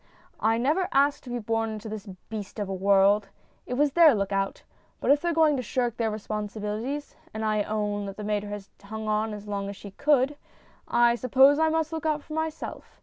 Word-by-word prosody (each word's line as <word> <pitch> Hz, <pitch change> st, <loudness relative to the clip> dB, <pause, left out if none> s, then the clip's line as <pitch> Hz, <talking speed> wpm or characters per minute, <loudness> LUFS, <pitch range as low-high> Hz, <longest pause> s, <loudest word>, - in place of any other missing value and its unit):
I 225 Hz, +1 st, +2 dB
never 305 Hz, +10 st, +1 dB
asked 280 Hz, +1 st, +2 dB
to -, -, -8 dB
be 245 Hz, -, -2 dB
born 225 Hz, 0 st, -1 dB
into 215 Hz, 0 st, -6 dB
this 215 Hz, -1 st, -7 dB, 0.2 s
beast 215 Hz, -2 st, -7 dB
of 205 Hz, -2 st, -2 dB
a 195 Hz, -, -3 dB
world. 195 Hz, +2 st, +3 dB, 0.4 s
It 250 Hz, -, -2 dB
was 290 Hz, +2 st, +3 dB
their 315 Hz, -3 st, +7 dB
look 200 Hz, -1 st, -1 dB
out. 195 Hz, 0 st, -1 dB, 0.4 s
But -, -, +2 dB
if 290 Hz, 0 st, +4 dB
they're 345 Hz, -, 0 dB
going 315 Hz, -2 st, +4 dB
to -, -, -1 dB
shirk 240 Hz, 0 st, -1 dB
their 230 Hz, -2 st, +1 dB
responsibilities 215 Hz, +5 st, -4 dB, 0.2 s
and 220 Hz, 0 st, -2 dB
I 215 Hz, -1 st, +1 dB
own 205 Hz, -1 st, -2 dB
that 195 Hz, -, -7 dB
the 210 Hz, -, -6 dB
mater 205 Hz, 0 st, -1 dB
has 205 Hz, -1 st, -7 dB
hung 220 Hz, +2 st, -6 dB
on 215 Hz, +1 st, 0 dB
as 210 Hz, -1 st, -7 dB
long 200 Hz, -1 st, -3 dB
as 200 Hz, -, -6 dB
she 200 Hz, 0 st, -10 dB
could 285 Hz, +3 st, +2 dB, 0.5 s
I 240 Hz, 0 st, +4 dB
suppose 265 Hz, +4 st, +5 dB
I 320 Hz, 0 st, +4 dB
must 320 Hz, 0 st, 0 dB
look 320 Hz, -1 st, -2 dB
out 300 Hz, -1 st, 0 dB
for 310 Hz, -, -9 dB
myself. 315 Hz, 0 st, -5 dB
220 Hz, 215 wpm, -27 LUFS, 205-285 Hz, 0.5 s, their